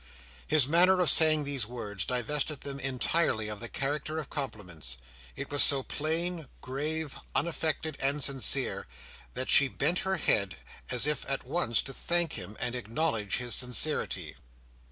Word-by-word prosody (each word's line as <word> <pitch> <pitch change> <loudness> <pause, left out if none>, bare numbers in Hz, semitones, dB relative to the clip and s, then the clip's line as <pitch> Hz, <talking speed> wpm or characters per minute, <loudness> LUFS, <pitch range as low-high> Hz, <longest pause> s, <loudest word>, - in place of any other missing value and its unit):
His 150 -4 +3
manner 180 +4 +4
of 175 -6 +5
saying 155 -2 +6
these 140 -6 -2
words, 105 -5 -6
divested 140 +4 -3
them 140 -1 -6
entirely 130 -3 -1
of 105 -1 -7
the 120 - -8
character 150 +3 -3
of 155 -3 -7
compliments. 90 - -5 0.4
It 140 +1 -7
was 145 - +5
so 140 -2 +8
plain, 165 +2 -1
grave, 150 +3 -4 0.2
unaffected, 160 0 -2
and 140 +1 -1
sincere, 135 -5 +1 0.5
that 130 +1 -2
she 140 - +8
bent 155 +6 -1
her 190 0 -2
head, 100 - 0 0.3
as 125 +1 +4
if 150 0 0
at 135 - -1
once 130 -4 0
to 135 - -6
thank 170 +3 +1
him, 100 +1 -8
and 120 -1 -2
acknowledge 115 -2 -2
his 120 -1 -3
sincerity. 125 -4 -1
140 Hz, 155 wpm, -28 LUFS, 120-155 Hz, 0.5 s, so